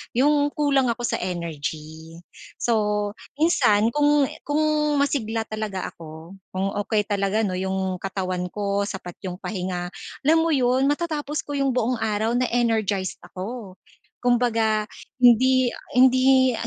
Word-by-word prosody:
yung 290 +3 +3
kulang 280 -3 +2
ako 235 +1 -2
sa - - 0
energy. 160 -2 -5 0.4
So, 210 -3 0 0.2
minsan 230 -9 +3
kung 295 +1 +3 0.2
kung 295 +1 0 0.3
masigla 235 -6 0
talaga 215 -3 -4
ako, 165 +3 -11 0.2
kung 190 +1 -1
okay 210 +1 0
talaga 205 +1 0
'no, 185 -3 -1
yung 190 0 -2
katawan 185 -2 -3
ko, 200 -1 -1
sapat 180 -3 -7
yung 180 -1 -4
pahinga, 180 -3 -3 0.3
alam 310 +4 +4
mo 325 0 +2
yun, 260 0 +2
matatapos 295 -1 -1
ko 290 -1 -4
yung 275 -2 +1
buong 250 0 +1
araw 220 +2 0
na 250 - +1
energized 220 -5 0
ako. 195 0 -7 0.5
Kumbaga, 230 -3 +2 0.3
hindi 250 +1 +5 0.2
hindi 260 0 +5
220 Hz, 130 wpm, -24 LUFS, 190-260 Hz, 0.5 s, hindi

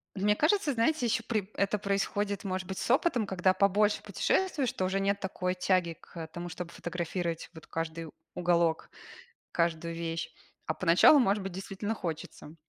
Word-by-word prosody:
От 190 - -5
мне 210 0 +4
кажется, 310 - +2
знаете, 250 +4 +1
еще 225 0 +1
при 215 -4 -2
это 200 +1 +1
происходит, 200 0 -1
может 185 -2 -3
быть, 190 - -5
с - - -1
опытом. 255 -4 +3
Когда 185 -1 +2
побольше 205 +2 +3
путешествуешь, 315 -10 0
то 185 - -1
уже 190 +1 0
нет 200 +1 +1
такой 185 -2 -2
тяги 180 -2 +1
к 165 -2 -9
тому, 175 +2 -7
чтобы 170 0 -6
фотографировать 170 -1 -3
вот 160 -2 -12
каждый 165 0 -4 0.3
уголок, 170 -2 +1 0.6
каждую 170 0 0
вещь. 165 0 -4 0.3
А 155 - -1
поначалу, 180 - +6
может 205 -5 +2
быть, 195 - -5
действительно 195 +3 -4
хочется. 160 -4 -6
190 Hz, 165 wpm, -30 LUFS, 170-210 Hz, 0.6 s, поначалу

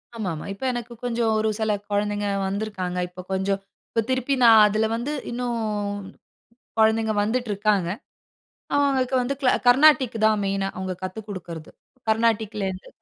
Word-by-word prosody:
ஆமாமா. 180 -9 -4
இப்ப 200 - -11
எனக்கு 240 0 -5
கொஞ்சம் 235 -2 0
ஒரு 220 0 +1
சில 220 -1 +1 0.2
குழந்தைங்க 205 0 0 0.2
வந்துருக்காங்க. 190 -3 -3
இப்போ 180 +1 -9
கொஞ்சம் 195 +1 0 0.3
இப்போ 230 - +1
திருப்பி 260 +1 0
நான் 225 -2 +8
அதுல 215 +1 +1
வந்து 240 +5 -3 0.2
இன்னும் 240 -1 -2 1.2
குழந்தைங்க 220 0 +3
வந்துட்ருக்காங்க. 210 -4 0 0.9
அவுங்களுக்கு 270 -2 +2
வந்து 260 +3 -1
க்ளா 260 -3 +4 0.2
கர்நாடிக் 260 -1 +5
தான் 215 -1 +3
மெயினா. 195 0 -1
அவுங்க 185 0 -3
கத்து 185 +3 -4
குடுக்குறது. 170 -5 -7 0.4
கர்நாடிக்லேருந்து 215 -4 0
220 Hz, 130 wpm, -24 LUFS, 195-240 Hz, 1.2 s, நான்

